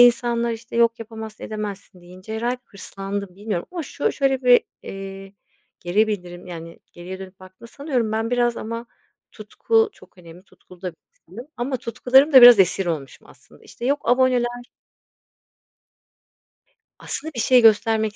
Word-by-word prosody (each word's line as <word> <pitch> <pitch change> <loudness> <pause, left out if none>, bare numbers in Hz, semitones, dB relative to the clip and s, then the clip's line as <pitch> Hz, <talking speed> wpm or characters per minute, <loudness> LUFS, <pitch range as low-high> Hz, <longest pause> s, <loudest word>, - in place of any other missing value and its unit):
insanlar, 235 -1 +4
işte, 230 +1 -8
yok 230 0 +3
yapamazsın 220 -1 -9
edemezsin 205 -3 -7
deyince 185 +5 -10
herhâlde 240 +3 -2
hırslandım. 195 -1 -7
Bilmiyorum 205 -4 -4
ama 345 - -4
şu 285 - -2
şöyle 270 -1 0
bir, 245 -1 +6 0.2
eee, 195 0 -9 0.5
geri 195 +5 +1
bildirim, 180 -4 -6
yani, 165 -1 -9
geriye 180 +2 -9
dönüp 190 0 -12
baktığımda 185 +5 -15
sanıyorum 255 -7 -2
ben 225 +1 -2
biraz 240 -1 +1
ama 230 +2 -6 0.5
tutku 450 0 0
çok 185 0 -20
önemli 170 0 -14
tutkulu 180 -2 -20
da 180 - -3
bir - - -32 0.3
insanım 240 +9 -10
ama 260 +2 -2
tutkularımın 250 +5 +2
da 260 -2 +9
biraz 245 -3 +10
esir 190 0 +2
olmuşum 145 -6 -5
aslında, - - -20
işte, 235 - -10
yok 285 +2 +1
aboneler 245 -1 +1 2.3
Aslında 315 - -3
bir - - -4
şey 250 +2 +5
göstermek 220 -1 +3
220 Hz, 150 wpm, -22 LUFS, 190-245 Hz, 2.3 s, biraz